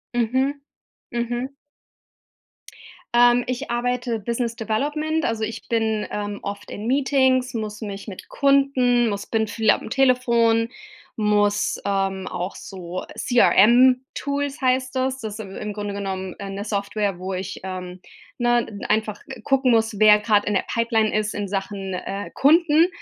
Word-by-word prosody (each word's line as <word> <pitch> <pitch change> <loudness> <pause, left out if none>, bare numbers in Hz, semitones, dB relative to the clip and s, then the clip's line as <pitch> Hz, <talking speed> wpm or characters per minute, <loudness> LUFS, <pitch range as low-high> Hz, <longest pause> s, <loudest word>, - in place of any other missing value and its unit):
Mhm 260 +4 0 0.5
mhm. 240 +2 -3 1.6
Ähm, 240 0 +5
ich 255 +2 -3
arbeite 245 -1 -1
Business 235 +2 -2
Development, 295 +8 -1
also 225 -1 -1
ich 225 +1 -5
bin, 220 -2 0
ähm, 205 0 -4
oft 200 0 -6
in 210 - -6
Meetings, 260 -1 +2
muss 215 -1 -5
mich 200 -1 -6
mit 195 -3 -9
Kunden, 270 -4 +3
muss 200 0 -4
bin 220 -1 0
viel 220 +1 0
am - - +2
Telefon, 235 -3 +3 0.5
muss, 205 -1 +1
ähm, 195 -1 -1
auch 180 +3 -4
so 185 -2 -7
CRM 245 +2 +5
Tools 285 +1 -3
heißt 255 0 +1
das 260 0 -1
Das 215 -1 -5
si 220 - -6
im 200 +2 -6
Grunde 205 -1 -4
genommen, 190 -2 -4
äh, 200 -1 -6
'ne 200 +2 -5
Software, 200 -1 -2
wo 190 +1 -4
ich, 185 0 -5
ähm, 185 -1 -6 0.4
ne, 240 -1 +2
n 200 -2 -9
einfach 215 -1 -1
ge - - -9
gucken 270 -2 +2
muss, 225 -2 +2
wer 210 0 +7
grad 210 -1 +2
in 210 - 0
der 195 - 0
Pipeline 225 -2 +1
ist 210 -1 -1
in 205 -1 -3
Sachen, 195 0 -4
äh, 195 +2 -5
Kunden, 320 +3 +4
225 Hz, 150 wpm, -23 LUFS, 205-255 Hz, 1.6 s, wer